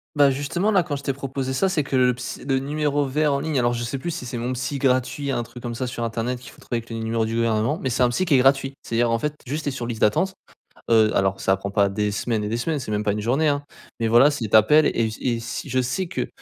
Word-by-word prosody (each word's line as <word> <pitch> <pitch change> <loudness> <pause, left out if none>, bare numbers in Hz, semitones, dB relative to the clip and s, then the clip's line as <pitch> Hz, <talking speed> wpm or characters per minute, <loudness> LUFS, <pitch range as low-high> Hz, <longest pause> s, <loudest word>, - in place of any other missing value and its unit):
Bah, 145 -2 +5
justement 145 +10 -1
là 195 -3 +4
quand 165 -4 -3
je 140 - -7
t'ai 140 - 0
proposé 135 -1 -4
ça, 130 +9 +1
c'est 180 -6 0
que 135 -1 -1
le 125 -1 +4
ps 125 +2 -6
le 135 -1 +2
numéro 145 +1 0
vert 145 +2 +1
en 140 - 0
ligne 155 -2 0
alors 120 0 +2
je 120 0 -3
sais 120 +4 -3
plus 170 +6 -4
si 160 -6 -5
c'est 120 0 -5
«Mon 120 +2 -2
psy 130 +3 -3
gratuit» 130 +1 0
un 120 -3 -1
truc 120 +1 -12
comme 120 -1 -5
ça 130 +2 -3
sur 120 -1 -3
Internet 115 +2 -2
qu'il 125 - -12
faut - - -19
trouver 120 - -3
avec 115 0 -7
les 115 - -5
numéros 115 0 -1
du 115 +1 -3
gouvernement 115 +4 +1
mais 130 - -1
c'est 125 - -1
un 125 - +6
psy 120 +9 0
qui 175 -5 +1
est - - +7
gratuit. 135 +1 +3
C'est-à-dire 115 0 0
en 115 - +1
fait 150 +4 -2
juste, 150 +5 -3
tu - - -1
es - - -3
sur 120 -3 -4
liste 115 -2 -4
d'attente, 175 - +2 0.6
heu, 110 -1 +4
alors 95 0 +1
ça 95 - +2
prend 100 +1 -6
pas 100 -1 +3
des 105 +1 -1
semaines 110 +1 -1
et 105 - -2
des 115 - -1
semaines, 150 +5 -1
c'est 110 - -5
même 105 0 -1
pas 100 - +2
une 105 - -3
journée 135 +8 +1
hein, 145 -1 +1 0.4
mais 115 - +1
voilà 120 +5 +7
si 125 -8 -3
tu - - +3
appelles 150 +8 +5
et 115 -1 +1
s 110 - -5
et 120 -2 0
si 115 +1 -6
je 130 - +1
sais 130 +10 -2
que - - -2
125 Hz, 305 wpm, -23 LUFS, 115-145 Hz, 0.6 s, est